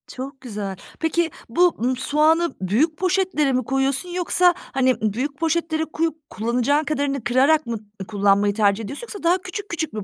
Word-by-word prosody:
Çok 265 +1 -7
güzel. 205 -6 -5 0.2
Peki, 325 0 0 0.2
bu, 350 +9 +3
ımm, 255 +1 +1
soğanı 315 +5 +2
büyük 260 - +1
poşetlere 365 -6 +1
mi 255 0 +1
koyuyorsun, 270 +6 0
yoksa, 355 0 +3
hani, 260 -6 0
büyük 250 +7 -2
poşetlere 320 -1 0
koyup 320 -1 -3
kullanacağın 245 +7 +1
kadarını 285 -4 -1
kırarak 275 +6 +3
mı 230 -2 -3 0.3
kullanmayı 205 -1 +2
tercih 205 0 +2
ediyorsun, 280 - -6
yoksa 410 -4 -8
daha 345 +2 +4
küçük 385 +3 -6
küçük 320 -6 -3
mü 215 -1 -4
285 Hz, 160 wpm, -22 LUFS, 240-330 Hz, 0.3 s, daha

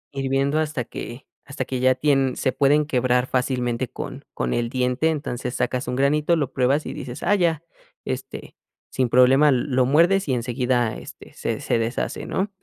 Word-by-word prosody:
Hirviendo 135 +2 0
hasta 150 -6 -2
que 120 +2 -8 0.2
hasta 140 +1 -5
que 130 -1 -3
ya 130 0 +5
tien 135 -1 +1
se 130 - 0
pueden 145 +2 +3
quebrar 125 -2 +1
fácilmente 125 -1 -1
con - - -7
con 60 - -2
el 120 -1 -1
diente, 125 +5 0
entonces 130 -5 -3
sacas 125 +1 -1
un 125 - -2
granito, 150 +4 +2
lo 140 -4 -2
pruebas 135 +3 +1
y - - -5
dices: 120 - -7
"Ah, 205 - +3
ya". 170 -4 +1 0.4
Este, - - -6 0.3
sin 130 -2 0
problema 135 +4 +5
lo 130 0 +1
muerdes 170 +5 +3
y - - +2
enseguida, 120 -1 0
este, - - -12
se - - -3
se 115 - 0
deshace, 115 +2 -3
¿no? 195 +2 -1
130 Hz, 175 wpm, -23 LUFS, 125-145 Hz, 0.4 s, ya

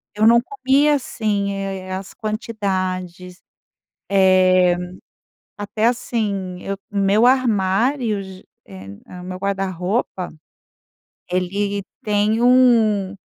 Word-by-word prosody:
Eu 215 +1 +3
não 235 +1 +6
comia 290 - +2
assim, 210 -6 -2
eh, 195 -1 -5
as 190 0 -6
quantidades, 185 -4 -4 0.7
eh, 185 -2 +4 0.8
até 210 +1 -2
assim, 205 -6 -2
eu 195 0 -4
meu 200 +3 +2
armário 230 -1 +1
ge 190 -1 -12 0.2
em 95 +1 -11
hã, 180 0 -10
meu 185 0 -6
guarda-roupa, 190 0 -2 1.0
ele 200 +3 -1 0.2
tem 210 0 +1
um 230 -6 +4
200 Hz, 95 wpm, -20 LUFS, 185-225 Hz, 1.0 s, não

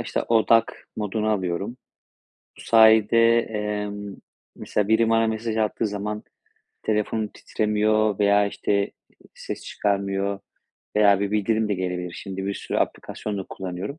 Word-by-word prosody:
işte, - - -2
odak 115 0 +2
moduna 110 +1 -1
alıyorum. 95 +4 -2 0.8
Bu - - -11
sayede, 115 +1 +5
emm, 105 -2 -4 0.4
mesela 105 -1 -2
biri 110 +1 +3
bana 115 0 +3
mesaj 110 0 -2
attığı 110 +1 0
zaman 105 +1 -4 0.6
telefonum 110 0 0
titremiyor 105 0 0
veya, 100 0 +4
işte, 100 - -3
ııı, 100 - 0 0.5
ses - - -7
çıkarmıyor 100 -1 -1 0.6
veya 100 -2 +5
bir 100 -1 -1
bildirim 110 +1 +1
de 105 - +1
gelebilir. 90 -1 -3
Şimdi 95 +1 -6
bir 100 - -2
sürü - - -3
aplikasyon 105 -2 -3
da 95 - -4
kullanıyorum. 95 - -6
105 Hz, 135 wpm, -24 LUFS, 100-110 Hz, 0.8 s, sayede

